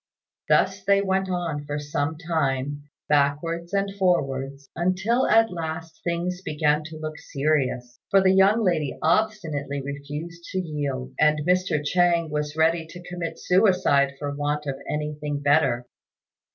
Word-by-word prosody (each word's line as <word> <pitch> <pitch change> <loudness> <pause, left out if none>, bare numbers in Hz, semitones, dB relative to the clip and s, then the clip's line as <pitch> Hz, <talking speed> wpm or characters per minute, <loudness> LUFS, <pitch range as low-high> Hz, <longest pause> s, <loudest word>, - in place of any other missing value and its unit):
Thus 195 +1 +3
they 200 +1 +4
went 190 0 0
on 170 -5 -2
for 145 0 -3
some 145 +1 -2
time, 145 -4 -1 0.2
backwards 150 +4 +1
and 200 0 0
forwards, 140 -6 0
until 190 +8 +1
at 225 -1 +4
last 160 -1 -6
things 175 +1 -2
began 150 -2 +1
to 155 0 -8
look 155 0 -6
serious, 130 -4 -1
for 195 - +5
the 190 0 +4
young 200 +4 +4
lady 155 -7 0
obstinately 160 -7 0
refused 145 +5 -6
to - - -1
yield; 145 -7 -3
and 150 0 +3
Mr. 180 -4 +1
Chang 170 0 +2
was 150 0 -2
ready 160 0 +2
to 175 +2 -11
commit 180 -2 -5
suicide 180 -8 +3
for 145 +1 -4
want 145 +1 -2
of 135 -2 -4
anything 150 -1 -3
better. 140 -4 +2
155 Hz, 140 wpm, -25 LUFS, 145-180 Hz, 0.2 s, for